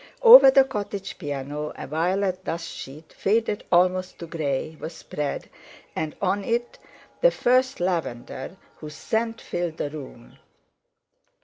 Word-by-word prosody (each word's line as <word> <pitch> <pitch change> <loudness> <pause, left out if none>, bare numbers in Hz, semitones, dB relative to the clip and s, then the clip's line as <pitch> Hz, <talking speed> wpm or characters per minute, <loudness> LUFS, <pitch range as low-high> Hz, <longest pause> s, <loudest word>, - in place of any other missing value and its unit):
Over 470 - +11
the 270 0 +6
cottage 205 -6 -5
piano 145 -1 -5
a - - -7
violet 185 +5 -1
dust 165 -1 -4
sheet, 150 +4 -10
faded 215 0 0
almost 185 +1 +2
to 170 - -7
grey, 155 -2 -3
was 165 - -6
spread, 145 -2 -5 0.5
and 155 -1 -3
on 200 +1 0
it 235 +3 -2 0.4
the - - +7
first 255 - +1
lavender, 170 -3 -3 0.2
whose 150 -1 -9
scent 225 +1 -2
filled 175 -2 -4
the 145 - -3
room. 130 -5 -11
175 Hz, 130 wpm, -24 LUFS, 150-210 Hz, 0.5 s, Over